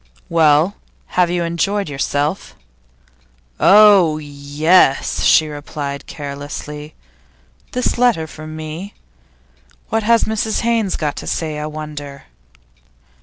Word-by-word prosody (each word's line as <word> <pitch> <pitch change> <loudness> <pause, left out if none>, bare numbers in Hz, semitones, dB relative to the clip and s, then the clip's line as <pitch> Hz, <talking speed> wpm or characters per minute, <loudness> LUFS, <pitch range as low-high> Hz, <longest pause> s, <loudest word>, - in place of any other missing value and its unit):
'Well, 160 +3 +3 0.4
have 180 -1 +3
you 175 0 -1
enjoyed 195 +4 -1
yourself?' 145 +4 -2 1.0
'Oh 200 -6 +6
yes!' 145 +1 +1
she 155 - +5
replied, 145 -1 -6
carelessly. 145 +1 -7 0.8
'This 250 -1 -1
letter 240 -10 +3
for 155 0 -10
me? 155 +5 -7 0.9
What 225 - 0
has 230 +2 +3
Mrs 220 0 -1
Haynes 230 -4 0
got 150 -2 -2
to 80 - -7
say, 150 - -3
I 150 - -4
wonder? 150 -2 -8
155 Hz, 105 wpm, -18 LUFS, 145-195 Hz, 1.0 s, Oh